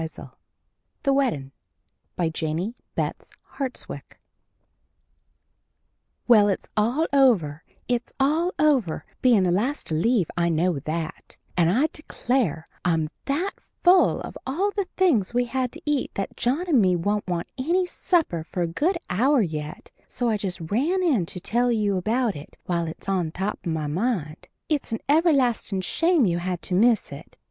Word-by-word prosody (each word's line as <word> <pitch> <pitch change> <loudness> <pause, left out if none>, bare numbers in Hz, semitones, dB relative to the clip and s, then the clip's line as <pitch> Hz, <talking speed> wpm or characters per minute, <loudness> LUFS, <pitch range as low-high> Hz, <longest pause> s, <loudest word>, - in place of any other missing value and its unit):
] - - -51
THE 275 - +3
WEDDIN' 230 - 0 0.6
BY 170 -2 0
JENNIE 160 +7 -3 0.2
BETTS - - -3 0.3
HARTSWICK 265 -3 -6 2.1
Well, 215 -4 +7
it's 195 - -1
over, 230 - +2 0.2
it's 245 -1 -1
all 315 +6 +2
over 270 - +2 0.2
bein' 235 -7 +5
the 180 - +2
last 240 +11 0
to - - -3
leave 195 +3 +2
I 170 -1 +1
know 165 -1 +1
that 160 +3 -5 0.2
and 170 -2 +3
I 255 - +3
declare, 240 - -1 0.2
I'm 165 -3 +1
that 330 +8 0 0.3
full 360 +1 +5
of - - -7
all 370 +10 0
the 400 -2 -2
things 245 - +2
we 245 0 +3
had 255 0 -2
to - - -10
eat 295 -3 0
that 195 - -3
John 285 +10 0
and 280 -9 +4
me 185 -2 +3
won't 205 +4 -1
want 175 -2 -2
any 350 +7 +2
supper 325 - 0
for 175 +2 -3
a - - 0
good 315 - 0
hour 250 +7 +3
yet, 150 -3 -6 0.2
so 245 -1 -1
I 220 - +1
just 190 -3 -4
ran 285 - 0
in 250 - +2
to 180 - -5
tell 240 +6 +1
you 210 -3 +1
about 225 +3 0
it 145 - -11
while 170 -2 -1
it's 160 - -8
on 185 -4 0
top 195 +5 -3
of - - 0
my 160 -1 -2
mind. 170 -1 -2 0.2
It's 295 -6 -1
an 225 - 0
everlastin' 275 - +2
shame 330 - +2
you 175 -2 +1
had 180 0 -3
to - - -3
miss 220 +1 +3
it! 145 +3 -11
215 Hz, 160 wpm, -24 LUFS, 175-275 Hz, 2.1 s, Well